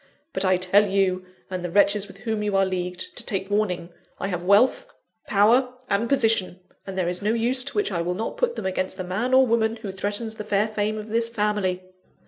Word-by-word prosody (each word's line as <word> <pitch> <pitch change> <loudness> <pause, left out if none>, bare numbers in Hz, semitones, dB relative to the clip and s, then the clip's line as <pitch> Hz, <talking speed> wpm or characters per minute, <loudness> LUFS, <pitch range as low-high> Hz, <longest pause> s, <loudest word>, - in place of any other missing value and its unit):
But 190 - -1
I 185 -1 +3
tell 195 +3 +4
you, 190 -2 0 0.2
and 185 -1 -3
the 175 - -3
wretches 200 +2 +3
with 190 - -13
whom 220 -2 -2
you 205 -2 0
are 195 - +4
leagued, 180 -1 -4
to - - +3
take 195 0 -3
warning: 180 -5 0 0.3
I 195 - -3
have 180 -2 -2
wealth, 215 - +3 0.4
power, 240 +5 +3 0.2
and 210 +4 +1
position; 225 -8 +2 0.3
and 190 -1 -6
there 180 -2 0
is 180 0 -3
no 210 +2 +1
use 245 +3 +1
to 280 - -4
which 415 - +1
I 170 -3 -1
will 175 +1 -2
not 220 +4 -3
put 480 -1 0
them - - -5
against 185 0 -2
the 185 - -3
man 195 +8 -2
or 260 0 +6
woman 225 -1 +1
who 220 -4 -6
threatens 205 +4 -2
the 215 - -7
fair 210 0 +1
fame 215 0 -2
of 215 0 -7
this 230 +1 0
family. 205 -5 -1
205 Hz, 225 wpm, -24 LUFS, 185-225 Hz, 0.4 s, or